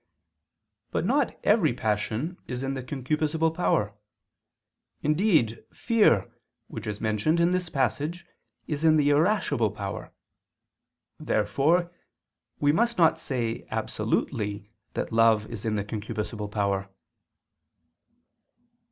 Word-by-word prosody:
But - - -1
not - - +1
every - - +4
passion 110 - -2
is 125 +1 -4
in 135 0 -1
the 130 - -4
concupiscible 155 +5 -1
power; 105 - +1 1.1
indeed, 150 - +2
fear, 210 - +2 0.3
which 110 0 -7
is 105 0 -4
mentioned 110 +10 +1
in 170 +1 +3
this 180 -1 -1
passage, 145 - -1 0.4
is 150 0 -3
in 155 -1 +5
the 145 -1 +3
irascible 150 - +2
power. 100 -2 -6 1.1
Therefore 150 - +1 0.7
we 145 0 +4
must 235 +8 +1
not 165 -2 +4
say 120 -7 -3
absolutely 105 -1 -2 0.2
that - - -3
love 115 -2 +4
is 115 -2 -6
in 110 -1 0
the 100 -1 -2
concupiscible 105 0 -4
power. 100 -1 -1
130 Hz, 110 wpm, -27 LUFS, 105-160 Hz, 1.1 s, in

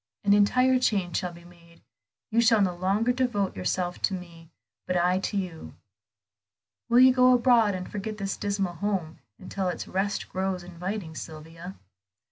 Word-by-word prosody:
An 200 -1 +4
entire 255 +5 +4
change 195 -8 0
shall 180 -2 -2
be 170 0 -14
made; 170 -1 -19 0.5
you 230 +1 +3
shall 225 -1 +4
no 190 -3 +2
longer 195 +7 +1
devote 240 -7 -1
yourself 175 - -2
to 195 - +1
me, 170 -3 -11 0.4
but 180 - 0
I 180 +1 +2
to 200 - -3
you. 180 -5 -5 1.1
Will 240 - +5
you 260 0 +7
go 255 0 +5
abroad, 235 -5 +4
and 185 0 -5
forget 210 +1 -5
this 195 -1 -3
dismal 200 -3 -2
home 175 -3 -3 0.2
until 190 0 -4
its 180 - -4
rest 195 +2 -2
grows 190 -1 -3
inviting, 180 0 -5
Sylvia?" 165 +4 -9
190 Hz, 160 wpm, -26 LUFS, 175-210 Hz, 1.1 s, you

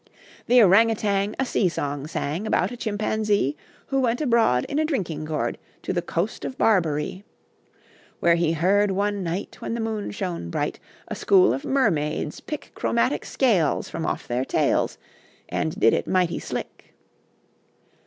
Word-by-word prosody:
The 245 -1 +7
Orang 210 +4 +6
Outang 205 -2 0
A 265 - +2
sea 195 -6 +1
song 145 -3 -3
sang, 160 +6 -3
About - - +1
a - - -5
Chimpanzee 210 - 0 0.3
Who 270 - +1
went 245 -2 +1
abroad, 230 - +3
In 290 - -1
a - - +3
drinking 180 - -2
gourd, 155 -1 -2 0.2
To - - -2
the 175 - 0
coast 175 +5 -3
of 260 - -5
Barberee. 170 -4 +1 1.0
Where 170 - +4
he 170 -1 +2
heard 195 +5 +3
one 200 +1 0
night, 180 +3 -4
When 230 - -3
the - - -3
moon 220 -2 -2
shone 180 - -4
bright, - - -2 0.3
A - - -4
school 185 -10 +4
of 135 - -4
mermaids 155 - 0
pick 300 - -7
Chromatic - - 0
scales 200 - +1
From 165 - -4
off - - -3
their 120 +2 0
tails, - - +1 0.5
And 160 - -2
did 115 - +5
it - - -1
mighty 180 -2 +1
slick. - - -7
195 Hz, 160 wpm, -24 LUFS, 160-225 Hz, 1.0 s, The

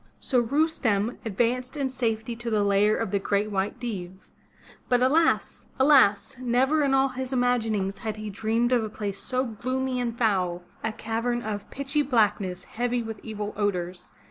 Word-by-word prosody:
So 255 - +1
Rustem 240 -6 +1
advanced 245 +6 -1
in 275 -2 0
safety 230 -2 -2
to 240 0 -4
the 215 -2 +2
lair 200 +1 +3
of 225 -5 -2
the 200 - +1
Great 205 +2 0
White 200 +4 -1
Deev. 190 -6 -6 0.6
But 245 0 +3
alas! 320 +6 +2
alas! 260 -6 +4
never 255 +5 +2
in 275 -2 +3
all 270 0 +3
his 260 0 -5
imaginings 225 -6 0
had 220 -2 -3
he 215 -1 -6
dreamed 225 +4 0
of 245 -3 +3
a 215 - -3
place 205 -2 -4
so 255 0 -1
gloomy 255 +3 -2
and 235 -1 -2
foul 185 -6 +1
— - - -29
a 220 - 0
cavern 230 +2 -2
of 210 -1 -4
pitchy 280 +2 -1
Blackness, 210 -8 +1
heavy 245 +1 -2
with 225 -2 -6
evil 210 -2 -5
odors. 180 -3 -2
225 Hz, 170 wpm, -26 LUFS, 205-255 Hz, 0.6 s, alas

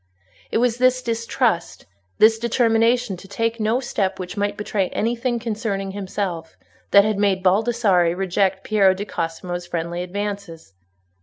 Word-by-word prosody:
It - - 0
was 240 0 +1
this 255 0 +3
distrust, 230 -5 -1 0.3
this 225 0 +5
determination 230 -2 +2
to 195 - -13
take 230 +3 -2
no 220 +3 +1
step 200 -7 -2
which 180 +1 -6
might 205 0 -1
betray 205 -2 -1
anything 240 +2 -1
concerning 215 -4 -3
himself, 190 -4 -4 0.3
that 200 0 +6
had 215 -2 0
made 195 -2 +1
Baldassarre 195 -3 +2
reject 190 +1 0
Piero 195 -3 +3
di 200 +2 -5
Cosimo's 175 0 -4
friendly 170 0 -3
advances. 195 - -5
205 Hz, 140 wpm, -22 LUFS, 185-230 Hz, 0.3 s, that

